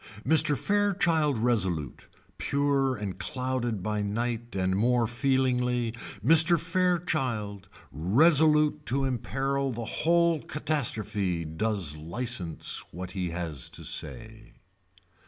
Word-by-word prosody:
Mr. 150 0 +4
Fairchild 180 - +1
Resolute 95 - -1 0.3
pure 140 -2 +1
and 105 -4 -6
clouded 125 -5 -3
by 105 0 -1
night 115 +2 -3
and 95 0 0
more 120 +3 +2
feelingly, 125 -1 0 0.3
Mr. 165 +3 +7
Fairchild 155 - -1 0.2
resolute 150 - +3
to 135 +2 0
emperil 135 +2 -2
the 115 -1 -5
whole 170 +3 +1
catastrophe 110 - -2
does 85 -1 -2
licence 90 +1 -2
what 90 +2 -7
he 90 -2 -3
has 85 -6 -5
to - - -8
say. 110 -1 -4
120 Hz, 100 wpm, -27 LUFS, 100-145 Hz, 0.3 s, Mr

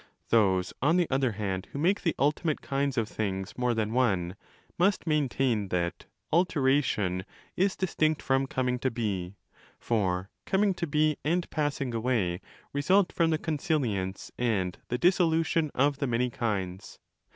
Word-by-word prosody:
Those, 95 -5 +3
on 160 +6 +3
the 175 -2 +2
other 130 -3 +1
hand, 95 -3 -3
who - - -6
make 180 +7 +2
the 165 - 0
ultimate 150 +2 0
kinds 140 -1 -1
of 115 -2 +1
s - - -16
things 95 -2 -3
more 125 -1 0
than 110 0 -1
one, 95 -8 +1 0.4
must 195 +1 +2
maintain 135 - +1
that 85 -2 -2 0.3
'alteration' 135 - +2 0.3
is 190 +1 +2
distinct 155 -4 +1
from 135 0 +1
coming 125 -1 -1
to 130 - +1
be: 100 -6 -3 0.4
for 95 -4 -1 0.2
coming 195 0 +2
to 170 -1 -3
be 150 0 +2
and 170 +3 0
passing 145 -4 -1
away 110 -7 0 0.3
result 185 +7 +3
from 165 -1 +2
the 160 - +2
consilfence 135 - -2
and 100 -7 0
the 125 - -1
dissolution 165 -1 +2
of 140 +1 +2
the 140 - 0
many 125 +1 0
kinds. 95 -6 -3
130 Hz, 150 wpm, -28 LUFS, 105-155 Hz, 0.4 s, Those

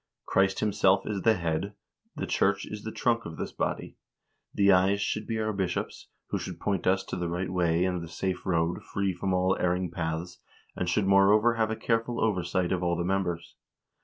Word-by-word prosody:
"Christ 95 0 +2
himself 100 -2 +3
is 100 -3 -2
the 110 +2 +4
head, 85 +3 -2 0.4
the - - -3
church - - +1
is 105 -1 -7
the 110 - -5
trunk 115 0 +1
of 80 -1 -8
this - - -4
body. - - -3 0.5
The 100 0 +4
eyes 95 +2 +4
should 105 +1 -2
be 115 - -2
our 110 0 -1
bishops, 95 -3 -3 0.2
who - - -1
should - - -6
point 100 -3 -1
us 95 +1 +3
to - - -5
the 90 -1 -2
right 90 +2 -2
way 85 -1 +2
and 90 -2 -1
the 85 - -7
safe 90 +2 -3
road, 85 -1 0
free 100 -1 -2
from 95 +2 -2
all 90 +1 +2
erring 90 0 0
paths, 80 +1 -4 0.4
and 90 - -2
should 100 +3 +1
moreover 100 +4 +5
have 110 -1 0
a 110 - -1
careful 115 +1 -1
oversight 90 -4 0
of 95 -1 0
all 85 -1 +1
the 85 - -1
members. 90 -3 -2
95 Hz, 200 wpm, -28 LUFS, 90-105 Hz, 0.5 s, moreover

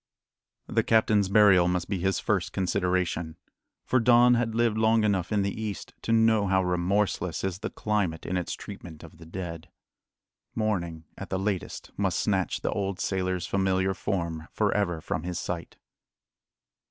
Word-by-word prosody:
The - - +1
captain's 110 -3 +3
burial 100 -4 +6
must 90 0 -1
be 100 -2 -2
his 95 0 +1
first - - -1
consideration; 90 -3 -1 0.5
for 130 - +2
Don 120 +1 +6
had 115 -2 0
lived 115 -2 +2
long 110 0 +3
enough 95 -3 0
in 105 -2 +2
the 100 - -1
East 105 -4 -5
to - - -3
know 110 -2 +4
how 95 0 +2
remorseless 90 0 0
is 95 -1 -2
the - - -4
climate 100 -7 -1
in 95 - -2
its 90 -1 -2
treatment 80 -2 -10
of 85 0 -13
the 80 - -12
dead. 85 -2 -6 0.9
Morning 85 -7 -1 0.2
at 100 - -7
the 95 - -1
latest 95 -1 -3
must - - 0
snatch - - 0
the - - -1
old 100 -2 -2
sailor's 95 -2 -1
familiar 95 0 +1
form 85 -5 -3
for 105 -2 +1
ever 85 -6 0
from 80 - -3
his 90 +1 -4
sight. 85 -1 -5
95 Hz, 165 wpm, -27 LUFS, 90-105 Hz, 0.9 s, burial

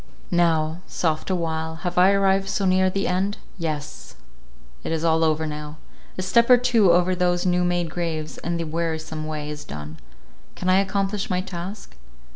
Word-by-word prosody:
Now—soft 160 -1 0
awhile—have 160 -1 -2
I 180 +2 +6
arrived 195 0 +2
so 195 - 0
near 185 0 +3
the 195 +1 -1
end? 190 +3 0 0.2
Yes! 150 -3 -5 0.7
it - - -3
is 165 0 -1
all 160 -1 +3
over 160 0 +1
now—a 150 +4 -8
step 235 +6 +3
or 250 - +9
two 235 -6 +4
over 180 +1 +3
those 180 0 +1
new 180 0 +2
made 175 -2 0
graves, 160 -3 -3
and 170 0 -2
the - - -1
wearisome 160 -1 -3
way 150 -1 -4
is 150 0 -7
done. 75 +1 -8 0.6
Can 185 - -2
I 185 - +5
accomplish 195 +1 -1
my 180 -1 +1
task? 185 - -7
175 Hz, 160 wpm, -23 LUFS, 160-185 Hz, 0.7 s, or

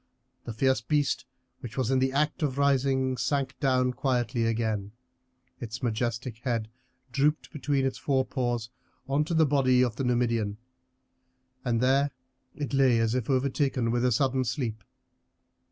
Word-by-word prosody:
The 115 - -5
fierce 130 0 +2
beast, 145 +3 0 0.3
which 120 0 -9
was 130 -1 0
in 130 - +3
the 130 0 +1
act 150 +5 0
of 140 -3 -1
rising, 135 -2 +2
sank 135 +2 -1
down 130 -2 +2
quietly 125 -3 0
again; 110 -3 -1 0.7
its 120 +2 -6
majestic 120 0 -2
head 115 -3 -2 0.4
drooped 145 +4 0
between 140 -2 0
its 135 - -2
forepaws 125 -4 -1 0.4
on 140 +2 +1
to 170 +1 -2
the 160 0 +5
body 130 -3 +3
of 120 -3 -1
the - - -1
Numidian, 115 -4 0 1.1
and 120 -2 0
there 135 +3 +3 0.5
it 145 -1 -4
lay 135 -3 +4
as 115 0 +1
if 125 -1 -2
overtaken 130 -2 +1
with 120 +1 0
a 125 - +3
sudden 130 +2 +2
sleep. 115 -4 -3
130 Hz, 150 wpm, -28 LUFS, 120-135 Hz, 1.1 s, the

